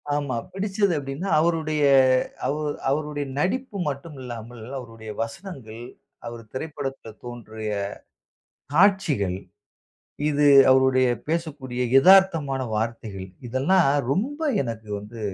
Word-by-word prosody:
ஆமா. 140 -4 -2 0.2
பிடிச்சது 195 -1 0
எப்படீன்னா, 140 +7 -4
அவுருடைய 155 -2 +1 0.6
அவு 150 +2 -1 0.3
அவுருடைய 145 0 -1
நடிப்பு 210 - -1
மட்டும் 145 +2 -7
இல்லாமல், 120 -2 -8
அவருடைய 115 -3 -9
வசனங்கள், 115 - -7 0.4
அவரு 115 -1 -7
திரைப்படத்தில் 135 -6 -6
தோன்றிய 110 -3 -6 1.0
காட்சிகள், 160 - +3 0.9
இது 145 0 +3 0.2
அவருடைய 130 -1 +4 0.2
பேசக்கூடிய 145 -7 -3 0.2
எதார்த்தமான 165 -6 +5
வார்த்தைகள் 110 -4 -4 0.2
இதெல்லாம் 140 +10 +3 0.3
ரொம்ப 275 - -1 0.2
எனக்கு 110 -3 -6
வந்து 105 +3 -11
135 Hz, 95 wpm, -24 LUFS, 115-165 Hz, 1.0 s, எதார்த்தமான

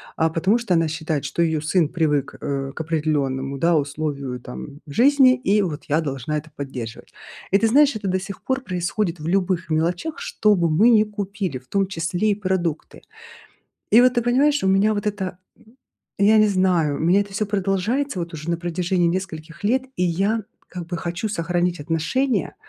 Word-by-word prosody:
а 160 0 +2
потому 190 +8 +1
что 205 -7 0
она 165 -1 +2
считает, 155 -2 -3
что 170 - -2
её 160 -2 +1
сын 155 0 +1
привык, 150 -5 0
э, 135 -1 -3
к - - -7
определённому, 140 -4 -1
да, 170 +3 +2
условию 140 -3 -2
там 140 +4 -9
жизни, 255 - +5
и 210 -4 +1
вот 155 -5 -4
я 150 +2 +2
должна 140 +1 -3
это 155 +1 -8
поддерживать. 125 -5 -7 0.4
И 195 - +4
ты 225 - +1
знаешь, 285 +1 +4
это 205 -2 -4
до 185 0 +1
сих 195 0 -8
пор 260 0 -1
происходит 180 -3 -2
в 155 - -8
любых 180 -3 0
мелочах, 175 - -1
что 210 -1 +2
бы 170 -4 +1
мы 210 +10 +5
не 215 -2 +6
купили, 200 -7 -4
в 125 - -16
том 195 +3 0
числе 180 +3 -1
и - - +1
продукты. 185 -6 -3 0.9
И 235 +3 +7
вот, 250 0 +5
ты 240 - +1
понимаешь, 275 +4 +2
у - - +1
меня 200 +3 +3
вот 205 0 -3
это, 190 -3 -3 0.2
м, 230 +4 -23 0.4
я 210 +2 +5
не 215 0 +6
знаю, 180 -6 +2
у - - -6
меня 180 +5 +4
это 200 -1 -12
всё 210 +1 -1
продолжается 200 +5 -1
вот 170 -1 -5
уже 155 +2 -5
на 170 - -1
протяжении 175 +1 0
нескольких 170 -1 -5
лет, 255 +5 +2
и 180 - -1
я 195 +6 0 0.3
как 180 -2 -6
бы 175 0 -4
хочу 175 +5 -3
сохранить 175 -2 -1
отношения, 165 - -1
180 Hz, 195 wpm, -22 LUFS, 155-210 Hz, 0.9 s, И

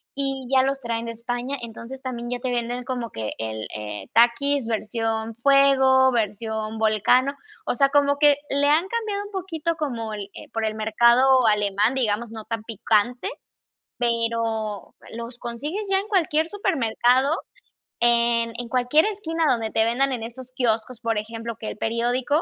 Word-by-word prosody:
y 270 -2 -1
ya 260 -1 +5
los 270 +1 -1
traen 235 -2 -3
de 230 - -4
España. 245 +4 -4
Entonces, 235 +3 -8
también 240 -2 -5
ya 245 - -2
te 255 0 -2
venden 245 +1 -2
como 245 -2 -4
que 110 -7 -4
el 110 -1 -4
el 105 -1 -6
Takis 240 +3 +3
versión 225 0 -2
fuego, 265 0 +5
versión 220 -1 -2
volcano. 220 +5 +3 0.3
O - - -1
sea, 275 +2 +3
como 285 0 +3
que 290 -1 +5
le 280 +1 +2
han 310 +5 +3
cambiado 420 -2 -3
un 410 - -11
poquito 335 -4 -3
como 235 -8 -4
el 205 -1 -6 0.2
por 225 -1 -1
el 215 0 -2
mercado 235 +3 +4 0.3
alemán, 205 +2 +1
digamos, 230 -2 0
no 220 -1 -8
tan 225 -2 -4
picante, 225 +2 0 0.7
pero 230 -3 -2 0.2
los 235 +1 -7
consigues 295 - -4
ya 385 - +4
en 400 - -6
cualquier 325 -6 +1
supermercado, 265 - +1 0.6
en 235 -1 +3
en 240 0 -5
cualquier 255 +5 +3
esquina 335 -6 -2
donde 230 -3 +1
te 220 - +2
vendan 265 +4 +2
en 235 -3 -4
estos 250 +2 -9
quioscos, 235 0 -1
por 230 -2 -1
ejemplo, 225 +1 -5
que 215 - -6
el - - -5
periódico, 245 +7 0
240 Hz, 165 wpm, -23 LUFS, 225-275 Hz, 0.7 s, ya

